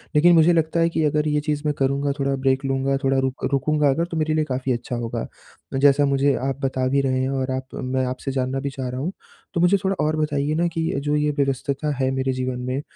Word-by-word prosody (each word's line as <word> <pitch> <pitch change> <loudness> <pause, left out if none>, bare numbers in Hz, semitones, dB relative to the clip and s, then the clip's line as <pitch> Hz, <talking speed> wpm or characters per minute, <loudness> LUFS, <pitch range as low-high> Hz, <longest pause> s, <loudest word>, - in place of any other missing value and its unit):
लेकिन 175 +4 +6
मुझे 165 +2 +5
लगता 165 0 +1
है 165 - +3
कि 160 -1 -1
अगर 150 +1 +1
ये 150 0 +1
चीज़ 150 -1 -2
मैं 150 - +1
करूँगा, 140 +1 +1
थोड़ा 140 0 +1
ब्रेक 135 +1 0
लूँगा, 135 0 0
थोड़ा 135 0 +2
रुक 130 0 -2
रुकूँगा 150 +2 +2
अगर, 165 +5 +1
तो 165 -2 -5
मेरे 155 0 +1
लिए 155 0 +2
काफ़ी 130 -1 -2
अच्छा 120 +1 -4
होगा। 120 -1 -3 0.5
तो - - -2
जैसा 145 0 +5
मुझे 140 0 +2
आप 135 0 -3
बता 130 -1 0
भी 140 +1 +2
रहे 130 -1 0
हैं 130 - 0
और 130 -1 -1
आप 130 0 -3 0.2
मैं 130 0 0
आपसे 130 +2 -4
जानना 130 0 -1
भी 140 +1 -3
चाह 135 -2 -5
रहा 125 +1 -4
हूँ, 175 +7 -2 0.4
तो 170 - 0
मुझे 180 +3 +5
थोड़ा 195 0 +1
और 155 - +1
बताइए 150 -1 0
ना 170 +1 +2
कि 165 - -1 0.2
जो 150 - +1
ये 150 0 +1
व्यवस्तता 140 +2 -1
है 130 0 0
मेरे 130 0 -1
जीवन 130 -1 -3
में, 130 +3 -2
140 Hz, 250 wpm, -23 LUFS, 130-150 Hz, 0.5 s, लेकिन